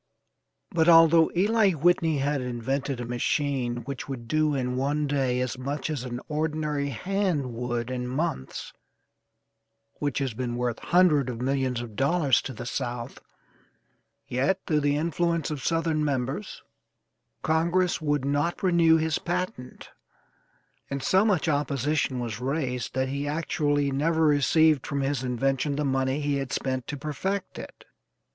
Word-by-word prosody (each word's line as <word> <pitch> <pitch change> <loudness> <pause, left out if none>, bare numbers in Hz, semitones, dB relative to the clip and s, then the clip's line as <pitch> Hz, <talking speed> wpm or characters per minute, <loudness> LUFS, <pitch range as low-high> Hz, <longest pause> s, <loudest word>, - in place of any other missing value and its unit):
But, 165 0 +3
although 165 -1 +7
Eli 205 +1 +3
Whitney 165 0 +2
had 140 0 0
invented 125 +2 -2
a 120 - -4
machine 120 0 -1
which 140 +2 -6
would 120 -4 -6
do 155 +2 +1
in 125 -1 -1
one 145 +3 0
day 135 -3 0
as 125 0 -3
much 140 +4 -3
as 140 -5 -3
an 120 -1 -5
ordinary 150 -2 -1
hand 155 - -1
would 120 0 -3
in 125 -1 -3
months, 130 - -3 1.3
which 145 -3 -1
has 135 -4 -1
been 120 +1 -3
worth 120 -1 -2
hundred 165 -7 +3
of 115 -2 -5
millions 130 -1 0
of 115 -3 -8
dollars 140 0 +2
to - - -6
the 120 - -7
South; 120 0 -4 1.1
yet, 135 +10 +1
through 155 -2 +2
the 145 0 +1
influence 170 0 0
of 145 -4 -4
Southern 165 -2 +1
members, 140 +7 -3 0.8
Congress 170 +3 +1
would 145 -3 0
not 145 +7 0
renew 170 -3 +5
his 160 -1 0
patent, 175 -8 -4 1.0
and 140 -1 -3
so 190 +6 +4
much 195 -7 +1
opposition 145 -2 0
was 115 -3 -4
raised 130 -3 -2
that 130 0 0
he 140 +1 -3
actually 145 -2 0
never 160 +4 +1
received 150 0 +3
from 140 0 -1
his 135 -1 -1
invention 135 +3 0
the 150 +1 -1
money 135 +1 0
he 145 -1 0
had 135 -1 -4
spent 130 -2 -2
to 145 - -4
perfect 185 +7 -3
it. - - -11
140 Hz, 150 wpm, -26 LUFS, 130-160 Hz, 1.3 s, although